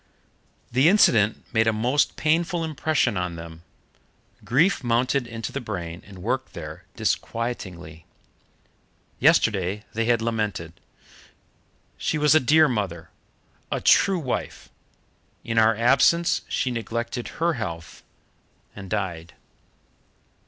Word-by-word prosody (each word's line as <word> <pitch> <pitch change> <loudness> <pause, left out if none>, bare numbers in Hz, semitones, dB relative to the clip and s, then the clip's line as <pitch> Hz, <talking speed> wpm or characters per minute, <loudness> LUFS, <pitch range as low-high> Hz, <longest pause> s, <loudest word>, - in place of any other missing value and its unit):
The 130 +6 +4
incident 115 - +3
made 110 -1 +3
a - - +4
most 120 +7 +1
painful 165 +2 0
impression 155 - 0
on 90 -1 -3
them. 80 0 -10 0.8
Grief 160 +7 +2
mounted 125 +2 +1
into 115 -1 -6
the 140 - -4
brain 90 -6 -6
and 95 -3 -12
worked - - -2
there - - -9
disquietingly. 90 -9 -4 1.1
Yesterday 105 -1 +2
they 115 +1 -1
had 120 0 +2
lamented: 105 -7 -3 1.3
"She - - -1
was 150 0 +4
a 155 - +6
dear 155 +4 +5
mother, 95 - -3 0.6
a - - 0
true 195 -1 +4
wife: 140 -7 -4 0.7
in 115 -1 0
our 110 0 +4
absence 135 +9 +3
she 125 0 -1
neglected 120 +1 -4
her 170 +1 +1
health 85 - -6 0.7
and 95 -2 -9
died." 90 -5 -4
115 Hz, 115 wpm, -24 LUFS, 95-140 Hz, 1.3 s, a